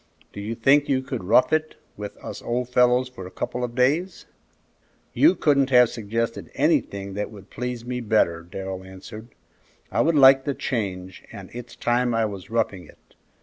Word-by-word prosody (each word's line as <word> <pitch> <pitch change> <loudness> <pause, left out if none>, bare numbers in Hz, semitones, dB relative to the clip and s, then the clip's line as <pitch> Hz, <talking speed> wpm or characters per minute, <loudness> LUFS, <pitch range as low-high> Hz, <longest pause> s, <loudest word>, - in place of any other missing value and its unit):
Do 100 - -7
you 110 +3 -4
think 140 +5 +3
you 130 -1 +1
could 110 - -5
'rough 110 +10 +4
it' 155 0 0 0.2
with 105 0 -8
us - - -8
old 125 +1 -2
fellows 125 0 +3
for 95 -8 -9
a - - -9
couple 125 +6 -4
of 120 -1 -4
days?" 150 +9 +1 0.9
"You 320 +4 +5
couldn't 140 -3 +2
have 125 -2 +6
suggested 115 +1 -3
anything 115 -10 0
that 105 +1 -3
would 100 -3 -14
please 125 0 -5
me 125 0 -3
better," 105 -7 +1
Darrell 95 +2 -7
answered. 95 +4 -11 0.6
"I - - +2
would 165 +1 +2
like 135 -1 +7
the 140 -1 -2
change, 95 -6 -4
and 100 -4 -10
it's 120 0 -9
time 120 0 +1
I 115 -1 +2
was 100 -4 -7
roughing 105 -7 -1
it. - - -22
120 Hz, 180 wpm, -24 LUFS, 100-130 Hz, 0.9 s, like